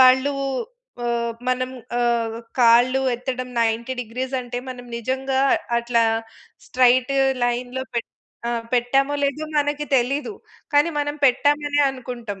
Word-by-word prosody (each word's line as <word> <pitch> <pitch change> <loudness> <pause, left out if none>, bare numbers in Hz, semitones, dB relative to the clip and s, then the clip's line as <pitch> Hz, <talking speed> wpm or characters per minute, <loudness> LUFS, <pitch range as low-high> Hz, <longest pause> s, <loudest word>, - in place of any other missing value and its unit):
వాళ్ళు 260 +2 +6 0.7
ఆహ్, 235 -1 -1 0.2
మనం 255 0 0 0.3
ఆహ్, 235 -2 +1 0.2
కాళ్ళు 245 +3 +5
ఎత్తడం 255 +1 -4
90 230 +3 0
డిగ్రీస్ 255 +4 -5
అంటే 245 0 -5
మనం 245 -1 -8
నిజంగా 265 +2 -1 0.4
అట్లా 235 -1 +2 0.6
స్ట్రెయిట్ 255 +1 +3 0.3
లైన్‌లో 245 +2 -2
పెట్ 235 - -2 0.4
ఆ! - - 0 0.2
పెట్టామో 270 +4 +2
లేదో 280 +2 0
మనకి 290 0 0
తెలీదు. 275 - 0 0.4
కానీ 290 +3 +5
మనం 290 0 -1
పెట్టామనే 290 +3 +3
అనుకుంటాం. 240 -6 -7
255 Hz, 115 wpm, -22 LUFS, 240-275 Hz, 0.7 s, వాళ్ళు